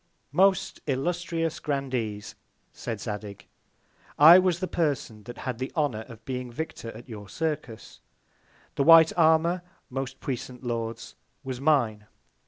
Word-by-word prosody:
Most 190 +4 +2
illustrious 165 +3 -1
Grandees, 125 -8 -3 0.4
said 115 -3 -5
Zadig, 105 -2 -6 0.7
I 165 +5 +10
was 180 -2 +1
the 185 - -2
Person 140 -11 -2
that 120 - -9
had 125 -3 -5
the 130 - -4
Honour 135 -9 -1
of 115 -3 -13
being 125 -2 -4
Victor 160 -3 -6
at 120 - -13
your 105 -4 -9
Circus; 150 -8 -4 0.7
the 140 - +1
white 165 +1 +8
Armour, 165 +2 +3 0.3
most 135 0 -4
puissant 130 -1 -5
Lords, 115 -1 -4 0.3
was 130 -1 -5
mine. 120 -9 +1
135 Hz, 130 wpm, -27 LUFS, 115-160 Hz, 0.7 s, I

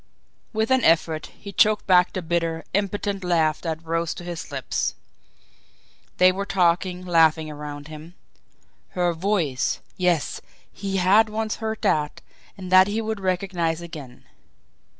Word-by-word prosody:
With 220 +2 -1
an 260 -3 +4
effort, 160 -1 +2
he 200 - -11
choked 215 +1 +3
back 180 -2 +4
the 185 - -3
bitter, 165 -1 -1
impotent 200 0 -1
laugh 160 -3 +1
that 165 -1 -4
rose 165 0 -1
to - - -8
his 170 -2 -6
lips. 135 -2 -2 1.2
They 185 0 +6
were 195 +2 -3
talking, 180 -1 +1
laughing 160 -2 +3
around 145 -1 -8
him. 155 +3 -11 0.8
Her 175 -1 +2
VOICE 165 -7 0 0.2
yes, 175 -4 0 0.3
he 195 0 -3
had 200 +4 +4
once 215 0 -2
heard 220 -1 -4
that, 150 -7 0 0.4
and 185 -2 -8
that 185 +1 +7
he 210 +2 -1
would 220 -1 -3
recognise 180 -3 -1
again. 150 -7 -10
180 Hz, 140 wpm, -24 LUFS, 160-195 Hz, 1.2 s, that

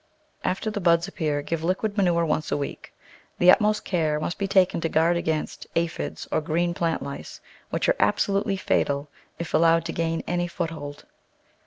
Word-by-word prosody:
After 190 +4 -1
the 205 -1 -3
buds 170 0 +3
appear 150 -6 -2
give 165 +1 -3
liquid 195 +4 0
manure 175 -4 +2
once 155 0 -1
a - - +1
week. 140 - -6 0.5
The 180 +1 +7
utmost 210 -1 +3
care 155 -5 0
must 170 +5 -3
be 200 - 0
taken 185 -3 +3
to 165 - 0
guard 165 +3 +3
against 160 -2 -2
aphides 170 0 -2
or - - +1
green 170 +3 0
plant 165 -4 -1
lice, 140 0 -7 0.3
which - - -1
are - - +4
absolutely 200 -1 +1
fatal 145 -5 0 0.3
if 170 - -6
al 160 - +4
lowed 165 0 +4
to - - -3
gain 165 0 -1
any 175 0 -1
foothold. 160 -4 -5
170 Hz, 180 wpm, -25 LUFS, 160-185 Hz, 0.5 s, The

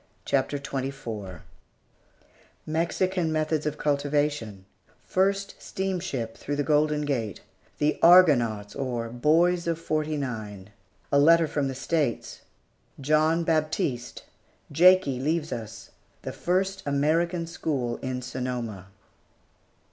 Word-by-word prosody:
] - - -38
CHAPTER 140 +1 0
XXIV 130 - -5 1.2
MEXICAN 170 +2 0
METHODS 155 -1 0
OF 150 0 -3
CULTIVATION 145 -9 -1 0.4
FIRST 195 +1 0
STEAMSHIP 180 -12 -3
THROUGH 145 - -4
THE 145 - 0
GOLDEN 150 0 +2
GATE 120 -7 -2 0.4
"THE 150 +1 0
ARGONAUTS" 120 - +5
OR 120 -4 -3
"BOYS 170 +8 +2
OF 165 -1 -1
'49" 130 - -3 0.4
A 140 - +4
LETTER 165 +2 +5
FROM 145 -2 -1
THE 135 - -4
STATES 140 -2 -2 0.6
JOHN 155 +4 +2
BAPTISTE 155 -6 -1 0.5
JAKIE 170 -4 +5
LEAVES 155 +3 -1
US 110 -1 -7 0.3
THE - - -5
FIRST 190 +2 -1
AMERICAN 165 +5 +1
SCHOOL 140 -7 -3
IN 130 -1 -4
SONOMA. 120 -6 -5
145 Hz, 105 wpm, -26 LUFS, 125-165 Hz, 1.2 s, ARGONAUTS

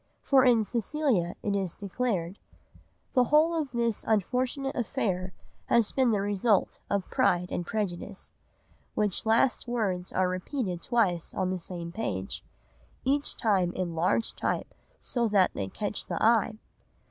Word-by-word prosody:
For 270 -2 +5
in 240 -4 +5
Cecilia 235 - 0
it 200 -1 0
is 190 -4 -2
declared, 200 -3 -2 0.7
"The 250 -2 +4
whole 310 +5 +4
of 315 -4 -1
this 235 -3 -1
unfortunate 250 - 0
affair 195 -7 -1 0.4
has 235 -3 +3
been 260 -2 +3
the 210 -3 +2
result 205 +1 +1
of 200 -2 0
PRIDE 180 0 +2
AND 175 - -3
PREJUDICE," 200 -2 -4 0.6
which 210 0 0
last 230 +3 +3
words 195 -7 -1
are 185 0 +2
repeated 185 - -3
twice 195 -8 +1
on 185 -1 0
the 185 - -2
same 170 -1 -6
page, 95 - -4 0.6
each 280 +2 0
time 190 -5 +2
in 180 -2 -2
large 180 +7 +1
type - - -2 0.3
so 240 -2 -1
that 200 -3 +4
they 95 - -3
catch 205 - -4
the - - -2
eye. 220 -1 +3
210 Hz, 145 wpm, -28 LUFS, 185-240 Hz, 0.7 s, For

